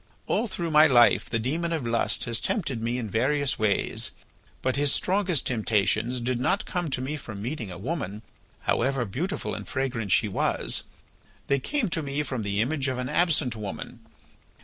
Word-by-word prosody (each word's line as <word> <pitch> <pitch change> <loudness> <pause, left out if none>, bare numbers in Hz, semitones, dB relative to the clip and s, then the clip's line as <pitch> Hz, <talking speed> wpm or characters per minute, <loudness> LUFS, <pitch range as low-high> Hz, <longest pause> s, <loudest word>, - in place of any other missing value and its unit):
All 240 - +1
through 170 -4 -3
my 155 +1 +7
life 120 -4 +5
the 115 - +1
demon 160 +9 -1
of 160 -7 -1
lust 115 0 +1
has 115 -2 +1
tempted 140 - -1
me 120 +2 -1
in 120 -3 -3
various 135 +6 +1
ways, 105 -2 +1 0.5
but 130 - +1
his 145 0 +2
strongest 185 -4 +1
temptations 115 +1 +1
did 120 0 -1
not 185 +10 +1
come 175 -4 -2
to 130 - -1
me 135 +4 -2
from 110 -8 -7
meeting 115 -1 -4
a 90 - -7
woman, 110 - -4 0.4
however 130 0 +1
beautiful 165 - -3
and - - -6
fragrant 125 -7 -2
she 110 - +4
was. 95 - -1 0.6
They 140 - +2
came 280 - -1
to 165 - 0
me 145 0 -2
from 130 -5 -3
the 100 0 0
image 140 +3 0
of 130 -1 -1
an 125 0 -3
absent 150 -6 +2
woman. 105 -3 -6
130 Hz, 180 wpm, -27 LUFS, 115-155 Hz, 0.6 s, my